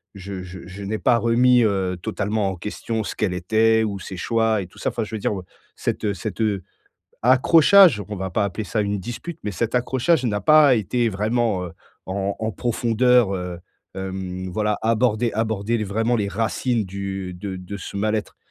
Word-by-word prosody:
je 95 -1 -7
je 90 +1 -9
je 95 +2 -8
n'ai 105 +2 -3
pas 120 - +3
remis, 120 +1 +4
heu, 95 -4 0
totalement 105 +1 -1
en 95 - -4
question 110 +4 -4
ce - - -5
qu'elle 105 -5 0
était 110 +5 +2
ou 100 -2 -3
ses 95 - -8
choix 115 +2 +1
et 90 - -7
tout - - -21
ça. - - 0
Enfin 115 - -3
je 110 +1 -6
veux - - -3
dire 105 - -1
ou 100 - -4
heu - - -15 0.3
cet, - - -3
heu 105 - +1
cet, 105 +4 -5
heu 105 -4 0 0.6
accrochage, 145 - +6
on 105 - -4
va 95 0 -4
pas 100 +4 +1
appeler 100 +2 -3
ça 110 +1 -1
une 100 0 -1
dispute, 120 - -7
mais 105 - -3
cet 115 +6 -2
accrochage 130 +4 +1
n'a 105 -4 0
pas 150 +3 +6
été 115 +3 0
vraiment, 110 -1 0
heu, 85 - -9 0.3
en 100 +1 -2
en 110 0 -2
profondeur, 120 -1 +2
heu 90 -2 -5 0.4
hem 95 -1 -5
voilà 105 +2 0
aborder 115 0 +1
aborder 110 0 -1
l 110 - -2
vraiment 110 +4 0
les 105 -3 -1
racines 115 +2 -1
du 95 -1 -5
de 95 +1 -6
de 90 +2 -7
ce 100 - -7
mal-être 105 -1 -1
105 Hz, 200 wpm, -22 LUFS, 95-115 Hz, 0.6 s, accrochage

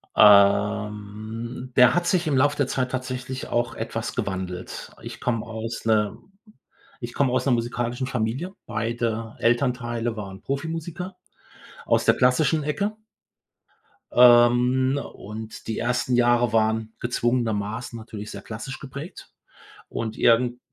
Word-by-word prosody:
Ähm, 105 +3 +3
der 125 +4 +6
hat 175 0 +1
sich 175 -2 +1
im 140 - +2
Lauf 145 +2 +3
der 140 - +1
Zeit 130 -1 -1
tatsächlich 130 0 -4
auch 120 0 0
etwas - - -4
gewandelt. 95 -1 -4
Ich - - -8
komme 115 -3 -1
aus 115 +1 -6
'ner 110 -1 +2 0.8
ich 120 0 -6
komme 135 -3 +2
aus 130 - +1
'ner 135 - +3
musikalischen 120 +1 -2
Familie. 130 - -2
Beide 115 0 -2
Elternteile 120 -1 0
waren 95 -3 -7
Profimusiker 165 +6 -4 0.7
aus - - +2
der - - +5
klassischen 140 +5 +3
Ecke 200 +8 -1 1.2
ähm, 125 +2 +5
und 110 +2 -9
die 110 - -2
ersten 125 +1 0
Jahre 120 -1 +3
waren 110 0 +1
gezwungenermaßen 120 -2 -1
natürlich 110 -2 -8
sehr 100 - -7
klassisch 115 +6 -7
geprägt 140 +5 -9 0.6
und 110 -1 -4
irgen 120 +1 +3
120 Hz, 125 wpm, -24 LUFS, 110-130 Hz, 1.2 s, der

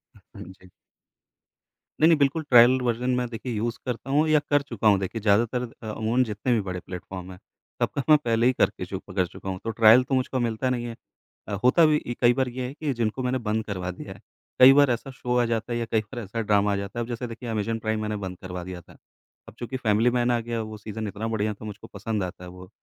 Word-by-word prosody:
ह - - -18 0.2
हाँ - - -8
जी। 95 0 -15 1.3
नहीं 160 - +7
नहीं, 165 - +5
बिल्कुल 145 +3 +1
ट्रायल 125 +1 +7
वर्ज़न 120 +1 -1
में 125 0 -1
देखिए 120 +1 -5
यूज़ 115 +2 -2
करता 125 +1 -4
हूँ 150 +3 +3
या 155 -1 +5
कर 145 0 +4
चुका 115 -6 -2
हूँ 100 -2 +5
देखिए 100 +4 -4
ज़्यादातर 115 +4 +2 0.2
अ, 110 - -6
अमूमन 110 +4 +1
जितने 110 +2 -3
भी 115 - +2
बड़े 90 -2 -5
प्लेटफॉर्म 90 +1 -8
हैं, 90 - -11 0.4
सबका 140 - 0
मैं 155 - +8
पहले 115 0 +2
ही 130 - +3
करके 90 - 0
चु 95 +1 -5
कर 95 -1 0
चुका 95 +2 -8
हूँ, 95 -1 -4
तो - - -3
ट्रायल 115 +2 +6
तो 135 +1 -1
मुझको 130 0 -1
मिलता 120 +1 -1
नहीं 120 -1 -2
है। 115 -1 -6 0.5
अ, 105 - -5
होता 145 +7 +5
भी 155 -1 +3
ई 120 - -2
कई 120 -1 +6
बार 130 0 0
ये 125 +1 -4
है 130 - -7
कि 150 -2 -3
जिनको 115 +2 -2
मैंने 125 +1 0
बंद 110 +1 0
करवा 90 -3 -4
दिया 90 - -9
है - - -17 0.4
कई 130 +1 +10
बार 140 -2 +5
ऐसा 120 +3 -3
शो 125 -1 -2
आ 120 - +3
जाता 115 0 -2
है 120 - -1
या 115 - -2
कई 110 - +3
बार 115 +3 -8
ऐसा 110 +3 -4
ड्रामा 105 -1 +2
आ - - 0
जाता 100 +3 -5
है, - - 0
अब - - -14
जैसे 120 +1 -4
देखिए 115 +1 -8
अमेज़न 115 +1 -2
प्राइम 110 -1 -2
मैंने 105 0 -2
बंद 90 -1 -7
करवा 90 -1 -6
दिया 90 -1 -7
था। - - -19 0.5
अब - - -12
चूँकि 125 +2 -4
फ़ैमिली 110 -1 +2
मैन 120 0 +1
आ 120 - +2
गया, 115 0 -3
वो 110 0 -7
सीज़न 110 +1 -6
इतना 105 +2 -4
बढ़िया 110 -1 -1
था, 105 - -11
मुझको 105 -1 -9
पसंद 110 -3 -3
आता 90 0 -7
है 90 - -8
वो 90 +1 -12
115 Hz, 260 wpm, -25 LUFS, 105-125 Hz, 1.3 s, कई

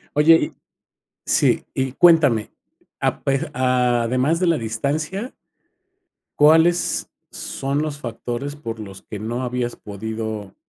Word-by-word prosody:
Oye 155 +2 +7
y - - -2 0.7
Sí, - - +2
y 130 -1 -2
cuéntame 150 -11 +4 0.5
a - - 0
pe 140 +4 0
a 125 -2 +2
además 130 +8 +1
de 185 - +1
la 165 -5 +2
distancia 155 - -3 1.0
¿cuáles 160 +4 +4 0.2
son 140 +2 -3
los 150 -2 -4
factores 120 +3 -5
por 115 -6 -6
los 95 -3 -9
que 105 - -8
no 120 +4 -3
habías 125 -1 -2
podido 110 0 -6
130 Hz, 125 wpm, -21 LUFS, 115-150 Hz, 1.0 s, Oye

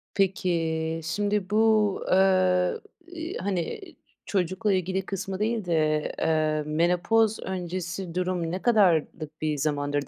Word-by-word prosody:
Peki, 165 -4 0
şimdi 205 +3 -1
bu, 215 +1 +3 0.5
ııı, 185 -1 +3 0.3
iii, 340 -1 -6
hani, 190 - -3 0.5
çocukla 190 +2 0
ilgili 190 +1 -1
kısmı 195 0 -4
değil 220 -2 -1
de, 155 -3 +1
eee, 155 -1 +1
menopoz 180 +8 +2
öncesi 180 -1 -4
durum 180 -2 -1
ne 185 - -3
kadarlık 165 -8 +1
bir 155 -1 -1
zamandır 145 0 -1
180 Hz, 115 wpm, -26 LUFS, 160-195 Hz, 0.5 s, bu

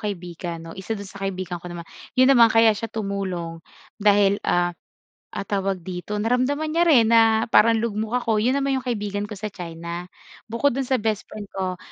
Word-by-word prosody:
kaibigan 175 -4 -5
'no. 165 0 -9
Isa 190 +4 -5
dun 200 -1 -8
sa 200 - -12
kaibigan 185 -2 -3
ko 180 - -10
naman 170 -1 -7 0.3
yun 255 +1 +6
naman 240 -4 +7
kaya 225 -1 +6
siya 225 +2 -4
tumulong 190 -6 -4 0.4
dahil, 205 -1 +4
ah, 175 0 +1 0.6
ah, 200 - -3
tawag 195 -2 -1
dito, 185 +3 -5
naramdaman 255 +7 0
niya 340 +1 +3
rin 235 -8 +6
na 225 -1 +5
parang 230 0 +5
lugmok 225 +2 -1
ako. 225 -2 +1
'Yon 255 +4 +2
naman 275 -1 0
'yong 260 - -8
kaibigan 205 -3 -2
ko - - -8
sa 215 - -3
China 170 0 -6 0.4
bukod 235 +5 +1
doon 270 - 0
sa 260 - +3
best 215 -1 -1
friend 205 -2 -7
ko 185 -1 -3
205 Hz, 190 wpm, -23 LUFS, 185-230 Hz, 0.6 s, naman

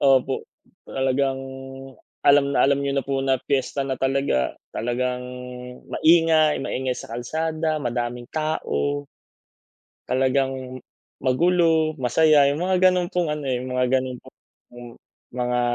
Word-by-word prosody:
opo, 135 -1 +2 0.4
talagang 135 0 0 0.8
alam 140 -1 +5
na - - +5
alam 140 0 +2
niyo 140 0 -1
na 135 - 0
po 135 -1 -1
na 135 -1 +2
piyesta 140 +1 -1
na 130 -2 -3
talaga. 135 - 0 0.2
Talagang 125 +2 -2 0.7
maingay, 160 -2 +4
maingay 130 -1 -2
sa 115 - -9
kalsada 155 +6 -2
madaming 120 0 -3
tao. 70 - -1 1.0
Talagang 130 0 0 0.4
magulo, 160 +3 +2
masaya, 145 +3 +4
yung 155 +4 -3
mga 185 0 +1
ganun 180 -1 0
pong 175 -2 0
ano, 150 -1 -4
eh, 125 -1 0
yung 125 0 -5
mga 125 0 +2
ganun 130 -1 -5
pong - - -17 1.0
mga 125 0 0
135 Hz, 125 wpm, -23 LUFS, 125-155 Hz, 1.0 s, alam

